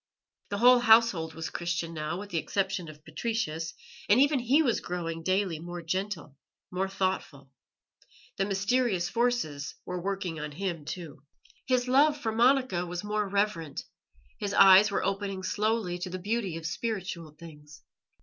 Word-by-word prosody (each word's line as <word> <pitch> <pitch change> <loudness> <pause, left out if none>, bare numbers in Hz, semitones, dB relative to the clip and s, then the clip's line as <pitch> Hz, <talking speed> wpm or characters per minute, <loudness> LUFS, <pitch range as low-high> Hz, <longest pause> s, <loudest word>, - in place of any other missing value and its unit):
The 200 - -2
whole 245 +3 +7
household 220 -9 +4
was 165 0 -5
Christian 170 -1 -3
now, 155 +1 -3
with 205 0 -9
the 165 - 0
exception 190 -1 -2
of 150 0 -14
Patricius, 160 -2 -3 0.3
and 210 +5 +6
even 285 0 +4
he 265 +6 +3
was 240 -6 +1
growing 165 -2 -4
daily 185 -2 0
more 175 +1 -7
gentle, 185 -3 -3 0.4
more 190 +1 -1
thoughtful; 185 -8 -3 0.8
the 195 - 0
mysterious 200 -1 +1
forces 230 -13 -1
were 180 -1 -4
working 190 -3 -3
on 150 0 -5
him 170 -3 -4
too. 155 -5 -7 0.5
His 255 -1 +1
love 290 +4 +4
for 230 -6 -2
Monica 245 -5 +3
was 175 +1 -5
more 210 -1 -1
reverent; 190 -7 -1 0.6
his 205 -2 -2
eyes 195 +2 +8
were 200 - -1
opening 195 -1 -2
slowly 210 -4 -1
to 180 - -4
the 185 - -4
beauty 200 -2 -2
of 165 - -8
spiritual 185 -5 -4
things. 150 -3 -13
190 Hz, 155 wpm, -28 LUFS, 165-220 Hz, 0.8 s, eyes